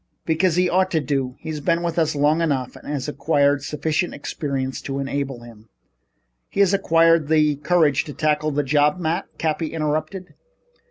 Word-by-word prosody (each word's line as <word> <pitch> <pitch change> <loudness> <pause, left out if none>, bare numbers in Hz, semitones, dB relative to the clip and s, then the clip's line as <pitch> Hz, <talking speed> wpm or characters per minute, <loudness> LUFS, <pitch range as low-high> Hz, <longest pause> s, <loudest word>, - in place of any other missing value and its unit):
"Because 165 +1 +1
he 180 0 +3
ought 185 +1 +2
to 165 - +1
do. 135 -2 -2
He's 160 -1 -5
been 170 +3 0
with 170 0 -1
us 160 -2 +1
long 150 +3 +2
enough 135 -6 -1
to - - -12
have 145 -2 -3
acquired 145 -1 +1
sufficient 155 +5 -2
experience 135 -4 -4
to 135 -1 -4
enable 135 -2 -3
him 115 -2 -15 0.4
" - - -50
"Has 200 -2 +4
he - - +3
acquired 165 -4 +3
the 150 -2 +3
courage 150 -1 +2
to 145 - -7
tackle 155 -1 +1
the 145 0 0
job, 150 +3 +2
Matt?" 175 +1 -2
Cappy 160 0 -1
interrupted. 155 +4 -3
150 Hz, 175 wpm, -22 LUFS, 140-165 Hz, 0.4 s, Has